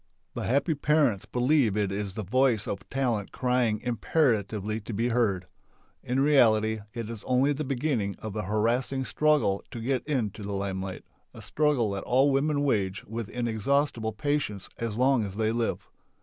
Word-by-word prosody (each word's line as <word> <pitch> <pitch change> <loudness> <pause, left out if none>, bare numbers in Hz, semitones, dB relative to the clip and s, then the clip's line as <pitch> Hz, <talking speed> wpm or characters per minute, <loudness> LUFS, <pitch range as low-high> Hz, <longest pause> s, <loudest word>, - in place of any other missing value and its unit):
The - - -4
happy 140 +6 +2
parents 145 -8 +2
believe 125 -4 +2
it 100 -2 0
is 100 -1 -4
the 110 - -3
voice 120 +1 +2
of 100 -1 -5
talent 120 -7 -1
crying 125 -4 +1
imperatively 110 -4 0
to 110 - -7
be 115 +4 0
heard. 105 -7 +1 0.6
In 125 +2 -1
reality 110 -6 +4 0.2
it 115 -2 -4
is 115 -2 -7
only 130 +3 +3
the 150 +2 -3
beginning 125 -7 -1
of 110 -2 -7
a 105 - -1
harassing 115 +6 0
struggle 150 -12 +2
to 120 - -7
get 125 +2 -1
into 115 -8 -1
the 100 0 -4
lime 95 -1 -2
light, 95 -1 -6 0.3
a - - -9
struggle 145 -8 +1
that 100 -1 -4
all 135 +3 +3
women 145 +1 +1
wage 100 -8 0
with 115 0 -5
in 120 -1 -2
exhaustible 115 0 0
patience 110 -4 -2
as 115 -3 -3
long 130 0 +3
as 100 -2 -5
they 110 0 +1
live. 115 0 -2
115 Hz, 175 wpm, -27 LUFS, 105-135 Hz, 0.6 s, reality